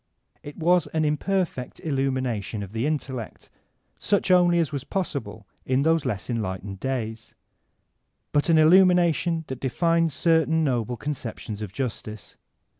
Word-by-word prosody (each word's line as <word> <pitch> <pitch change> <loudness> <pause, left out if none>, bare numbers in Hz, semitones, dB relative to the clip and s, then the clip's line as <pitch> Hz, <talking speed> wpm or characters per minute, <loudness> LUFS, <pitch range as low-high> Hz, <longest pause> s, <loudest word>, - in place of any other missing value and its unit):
'' - - -41
It 145 - -14
was 175 +2 +3
an 155 -1 +2
imperfect 150 -3 -1
illumination 130 - -2
of 100 - -9
the 115 +5 -1
intellect, 130 -7 -4 0.5
such 200 -2 +1
only 175 -1 +5
as 165 -3 +1
was 140 -3 -4
possible 125 - -4 0.2
in 130 +1 +1
those 160 -1 +2
less 105 -8 -3
en 115 -2 -1
lightened 95 0 -5
days, 115 -3 -4 1.0
but 145 +3 +1
an 165 - +5
illumination 170 0 +4
that 130 -3 -6
defined 165 +5 +1
certain 160 +2 +2
noble 125 -4 -1
conceptions 115 -7 -5
of 105 -3 -5
justice. 110 -3 -5
140 Hz, 140 wpm, -25 LUFS, 115-165 Hz, 1.0 s, only